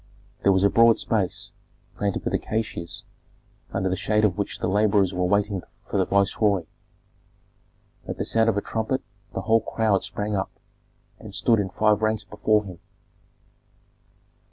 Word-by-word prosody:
That 100 - +4
was 95 0 +3
a 100 - +5
broad 115 0 +6
space, 100 -5 -1 0.4
planted 100 -2 -2
with - - -1
acacias, 110 -6 -3 0.7
under 95 0 -1
the 95 - 0
shade 105 +2 +1
of 95 -4 +1
which 100 0 -3
the - - -2
laborers 100 -1 +3
were 90 0 0
waiting 100 0 +1 0.2
for - - -2
the 95 - +3
viceroy. 100 -1 +2 1.4
At - - -4
the - - -2
sound 115 0 +3
of 105 - 0
a - - +1
trumpet 115 +6 -2 0.3
the - - -1
whole 115 +2 +3
crowd 110 -3 +1
sprang 105 0 -3
up, 95 0 -1 0.7
and - - -7
stood 115 -2 +3
in 100 -2 -1
five 105 +2 +2
ranks 110 -1 +1
before 105 +1 +1
him. 90 -3 -9
105 Hz, 155 wpm, -24 LUFS, 95-110 Hz, 1.4 s, broad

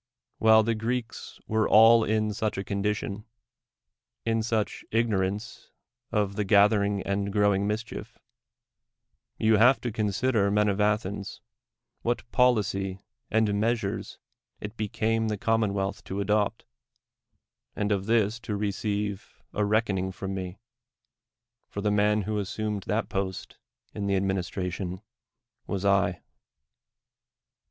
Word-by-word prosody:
AYhile 110 -1 +6
the 115 - +1
Greeks 115 +2 -4
were 110 0 +1
all 115 +1 +7
in 110 -1 0
such 110 0 -2
a 95 - -2
condition 100 +1 -2 0.5
— - - -61
in 115 0 +1
such 110 -1 -1
ignorance 105 0 -1 0.4
of 105 -2 0
the 105 - 0
gathering 100 0 +3
and 100 0 -1
growing 100 -1 +2
mischief— 110 +2 -5 1.2
you 110 0 +4
have 125 +5 +6
to 120 - -2
consider, 105 +1 +1
iiwn 105 +1 +2
of 100 +1 -1
Athens, 105 -1 -1 0.6
what 120 -1 -2
policy 100 -6 +1 0.3
and 110 -2 +2
meas 115 +1 +1
ures 100 +2 -4 0.4
it 105 +2 -7
became 110 +1 0
the 105 -1 -1
commonwealth 100 -2 0
to 95 - -4
adopt, 105 +2 0 1.1
and 105 0 -1
of 100 -1 0
this 110 -1 +2
to 110 -2 -4
receive 100 -1 -3
a 105 - 0
reckoning 100 -3 +1
from 95 +1 -5
me; 95 0 -5 1.1
for 100 - -5
the 105 0 +1
man 105 0 +2
who 105 +2 -2
assumed 105 +1 -3
that 110 +2 0
post 95 -1 -4 0.3
in 100 -1 -3
the 100 - +2
administra 95 -1 -1
tion 95 +1 -5 0.6
was 100 0 -3
I. 95 -3 +2
105 Hz, 130 wpm, -27 LUFS, 100-110 Hz, 1.2 s, all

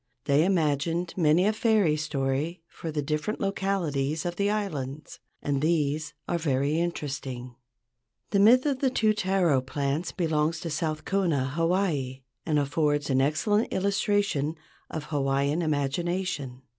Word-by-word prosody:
They 145 +3 +4
imagined 165 -1 0
many 170 +1 +4
a 215 - +3
fairy 215 -8 +3
story 150 +2 -2
for 165 - -7
the 150 -1 -2
different 150 +8 -2
localities 170 -7 -1
of 175 0 -2
the 200 +2 +1
islands, 155 -9 -4 0.2
and 140 -2 0
these 155 -1 0
are 170 - 0
very 145 0 +1
interesting. 135 -7 -4 0.8
The 200 - +3
myth 240 +6 +6
of 280 -3 0
the 265 - +2
two 220 -4 +2
taro 185 -9 +2
plants 140 +5 -2
belongs 160 -2 0
to 165 - -4
South 155 0 -2
Kona, 165 -9 +1
Hawaii, 165 -6 0 0.2
and 150 - +2
affords 145 0 +1
an 130 0 +3
excellent 205 - +1
illustration 200 -6 +1 0.3
of 160 - -4
Hawaiian 140 +1 0
imagination. 145 -2 -2
155 Hz, 135 wpm, -27 LUFS, 140-185 Hz, 0.8 s, myth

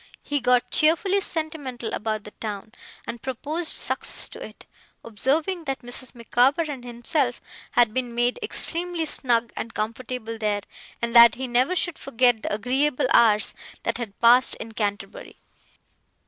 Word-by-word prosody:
He 290 0 -1
got 250 -1 +2
cheerfully 355 +6 +3
sentimental 295 -9 -4
about 215 -1 -2
the 210 - -10
town, 210 -1 -6 0.3
and 235 -1 -6
proposed 300 +6 -1
success - - -1
to - - -9
it; - - -11 0.4
observing 300 - -1
that 270 -2 -3
Mrs. 245 +1 -5
Micawber 250 +6 +2
and 260 -4 -7
himself 245 +2 -1 0.3
had 235 -3 +4
been 245 -2 -3
made 240 +1 +1
extremely 345 -1 -1
snug 240 -5 +1
and 225 - -6
comfortable 230 +1 -4
there 210 -2 0 0.4
and 235 0 -2
that 235 -1 +9
he 260 +1 -4
never 250 +8 +2
should 350 -3 -1
forget 245 -3 +2
the - - -4
agreeable 255 +6 0
hours 215 -3 +5 0.3
they - - +1
had 220 -5 -6
passed 245 +2 +5
in 225 - -8
Canterbury. 215 - -4
245 Hz, 145 wpm, -24 LUFS, 230-290 Hz, 0.4 s, that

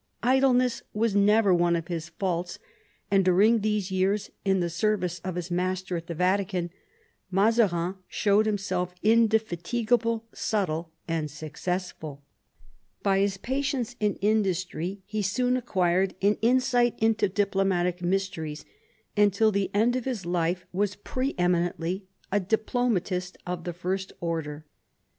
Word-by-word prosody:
Idleness 255 -1 +3
was 220 -1 +1
never 205 0 +5
one 175 0 +3
of 165 -1 -3
his 170 -1 -4
faults, 175 -1 -2 0.5
and 195 -1 +4
during 200 +6 +4
these 210 -2 -1
years 190 +2 0
in 195 -1 +2
the 175 - 0
service 180 0 0
of 185 +1 -5
his 180 0 -4
master 185 +1 -1
at 165 0 -5
the 170 - -4
Vatican 180 0 0 0.6
Mazarin 195 -3 +2
showed 210 +1 +2
himself 195 -3 -1
indefatigable, 225 +1 +2
subtle, 170 -6 -1 0.2
and 165 -2 -1
successful. 155 -1 -5 0.8
By 195 -1 +3
his 195 -1 +1
patience 265 0 -2
and 210 -1 +1
industry 190 -3 0
he 215 0 -3
soon 250 +6 +1
acquired 185 -5 +1
an 205 +2 +2
insight 245 0 +3
into 220 -2 +2
diplomatic 190 -3 +1
mysteries, 175 -4 -2 0.5
and 205 -1 +5
till 215 +3 +3
the 200 -2 0
end 225 +5 +2
of 255 - -2
his 240 -9 -3
life 175 +1 0
was 200 +1 0
pre 255 +7 -3
eminently 175 +1 0 0.2
a 205 - +3
diplomatist 205 -3 -1
of 175 -1 -4
the 175 - -3
first 190 +2 -3
order. 160 -3 -3
190 Hz, 135 wpm, -27 LUFS, 175-215 Hz, 0.8 s, never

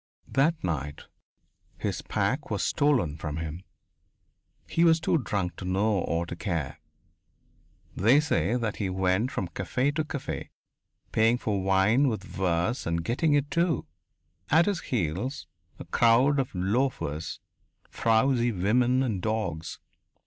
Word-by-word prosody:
That 155 +4 +1
night 75 -4 -3 0.7
his - - -3
pack - - -1
was - - -1
stolen 125 - +1
from 75 -1 -4
him. 80 +1 -5 1.1
He 165 - +1
was 165 -1 +5
too 160 +1 +1
drunk 95 - -2
to - - -7
know 100 +2 +1
or 85 -1 -1
to 85 - -6
care. 85 -6 -3 1.2
They 120 +9 +5
say 145 -6 +1
that 115 -4 -2
he 100 -3 -2
went 95 +5 +1
from 90 - -2
café 130 +9 -1
to 155 +1 0
café, 145 -2 -5 0.6
paying 115 +2 +3
for 105 -5 -1
wine 95 +8 +3
with 110 -6 -2
verse, 90 +6 -1
and 85 0 -1
getting 145 +6 +1
it, 145 0 0
too! 170 -4 +1 0.6
At 160 +4 +5
his 200 -3 0
heels 105 - -2 0.3
a - - -9
crowd 125 +5 +4
of 130 -6 -2
loafers, 95 - -1 0.5
frowsy 120 +2 +2
women 120 +7 +2
and 110 -8 -2
dogs. 110 -7 -3
110 Hz, 135 wpm, -27 LUFS, 90-135 Hz, 1.2 s, was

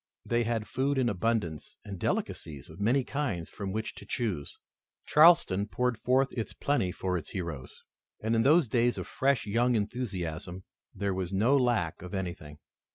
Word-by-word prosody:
They 120 0 +1
had 115 -2 -1
food 140 +2 0
in 125 -2 +2
abundance 100 -6 -2
and 100 -3 -7
delicacies 75 -5 -3
of - - -13
many 120 +6 +2
kinds 125 - -3
from 100 -2 -5
which 110 +2 -3
to - - -11
choose. 100 - -3 0.5
Charleston 150 - +5
poured 125 +2 0
forth 130 +2 +2
its 115 -3 -3
plenty 140 -11 0
for 90 -1 -2
its 80 - -10
heroes, 85 -8 -6 0.4
and 110 +1 0
in 115 - +3
those 150 +3 +5
days 120 +2 +2
of - - -4
fresh 135 -4 +1
young 120 +4 +2
enthusiasm 95 -6 -3 0.3
there 100 -1 -2
was 95 -1 -3
no 110 +8 +3
lack 120 - +1
of 90 +3 -6
anything. 85 -6 -5
110 Hz, 165 wpm, -29 LUFS, 90-125 Hz, 0.5 s, Charleston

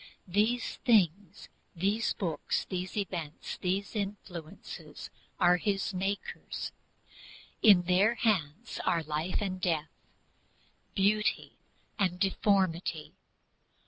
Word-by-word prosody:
These 215 +6 +1
things, 200 - +2 0.3
these 200 +6 +1
books, 165 -6 -2
these 185 +1 -4
events, 170 -7 -4
these 195 +4 -1
influences 195 -6 -6 0.3
are 180 -1 +5
his 195 +1 -1
makers. 195 +2 -3 0.9
In 200 -5 +7
their 190 +6 +3
hands 210 -2 0
are 165 -1 +1
life 155 +4 -1
and 185 -2 -3
death, 160 -4 0 1.0
beauty 210 +2 +2 0.5
and 180 -3 +1
deformity. 185 -5 +1
190 Hz, 90 wpm, -31 LUFS, 175-205 Hz, 1.0 s, In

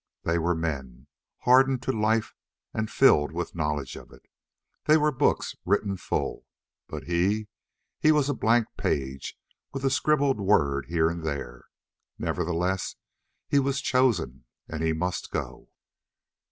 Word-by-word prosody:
They 85 0 +1
were 85 +1 +1
men, 70 -7 -4 0.4
hardened 130 0 +4
to 130 - 0
life 110 -1 +1 0.4
and 110 0 -2
filled 95 - +4
with 85 +2 -4
knowledge 75 -4 -2
of - - -12
it. - - -17 0.6
They 155 +1 +6
were 150 0 +2
books 130 - +1
written 100 0 +1
full. 90 - -3 0.4
But - - -6
he? 95 +5 0 0.5
He 155 - +5
was 150 -3 +3
a 145 - +1
blank 115 -1 +3
page 65 -1 -2 0.3
with 135 0 -4
a 135 - +3
scribbled 145 -2 +2
word 75 -9 +2
here 80 -1 +2
and 85 0 -3
there. 70 -6 -5 0.5
Nevertheless, 90 +2 -1 0.5
he 140 - +3
was 140 0 0
chosen 120 - +1 0.2
and 80 -1 -5
he 80 0 +2
must 90 +3 -2
go. - - -5
95 Hz, 140 wpm, -27 LUFS, 80-130 Hz, 0.6 s, They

